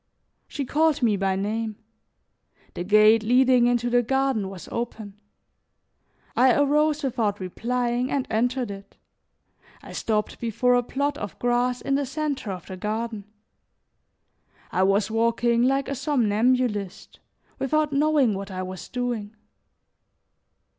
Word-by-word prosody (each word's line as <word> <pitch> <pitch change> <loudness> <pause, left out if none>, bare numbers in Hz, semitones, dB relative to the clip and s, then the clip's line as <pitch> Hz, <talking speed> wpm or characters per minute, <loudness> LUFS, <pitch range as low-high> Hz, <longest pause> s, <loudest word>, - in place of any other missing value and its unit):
She 280 - -4
called 305 0 +1
me 220 -3 +3
by 195 -1 0
name. 215 +3 -2 1.0
The 175 - -4
gate 215 +3 +5
leading 250 +2 +4
into 245 0 +1
the 245 0 +3
garden 265 -4 0
was 190 -2 -10
open; 215 -3 -5 1.1
I 255 -1 +5
arose 300 +1 +2
without 225 -6 -1
replying 240 +6 -2
and 275 -2 -1
entered 245 +1 0
it, 195 0 -11 0.9
I - - -11
stopped 215 -2 -2
before 240 +2 +1
a 245 - +4
plot 280 +4 -2
of 205 - -6
grass 245 +1 0
in 275 - -1
the 280 0 0
center 280 -6 -3
of 180 -3 -7
the 185 - -8
garden; 215 +1 -4 1.5
I 185 - 0
was 195 +2 +2
walking 235 +1 +2
like 270 +2 +2
a - - -2
somnambulist, 245 - 0 0.4
without 305 +1 0
knowing 285 -5 +3
what 195 0 -5
I 185 -1 -4
was 185 0 -8
doing. 240 -4 -3
240 Hz, 130 wpm, -24 LUFS, 210-265 Hz, 1.5 s, gate